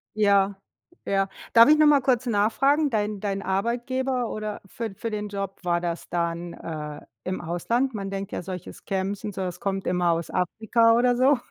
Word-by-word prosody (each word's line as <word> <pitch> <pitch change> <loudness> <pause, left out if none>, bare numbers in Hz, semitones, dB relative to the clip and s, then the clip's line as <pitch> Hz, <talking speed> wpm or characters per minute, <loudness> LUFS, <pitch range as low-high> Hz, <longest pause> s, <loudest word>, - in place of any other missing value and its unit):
Ja. 200 -1 +3 0.5
Ja. 195 0 +1 0.3
Darf 230 +2 +9
ich 305 - +7
noch 305 0 +6
mal 285 -2 +6
kurz 255 -1 +1
nachfragen? 270 +8 +2
Dein 210 -2 -1
dein 195 -1 -2
Arbeitgeber 240 +6 -1
oder 215 -1 -5
für 225 +1 -5
für 230 - -4
den 210 0 -3
Job 195 -1 -5
war 175 -1 +1
das 170 -1 -3
dann, 170 0 -2
äh, 150 -2 -6 0.2
im 185 0 -3
Ausland? 230 +10 -1
Man 195 -2 -4
denkt 195 0 -5
ja, - - -3
solches 180 -1 -7
Scams 195 +1 -3
und 210 - -4
sowas 185 -2 -4
kommt 195 -1 -2
immer 180 -1 +2
aus 165 0 -2
Afrika 225 +5 +2
oder 245 0 +3
so. 265 +1 +4
205 Hz, 185 wpm, -25 LUFS, 185-235 Hz, 0.5 s, Darf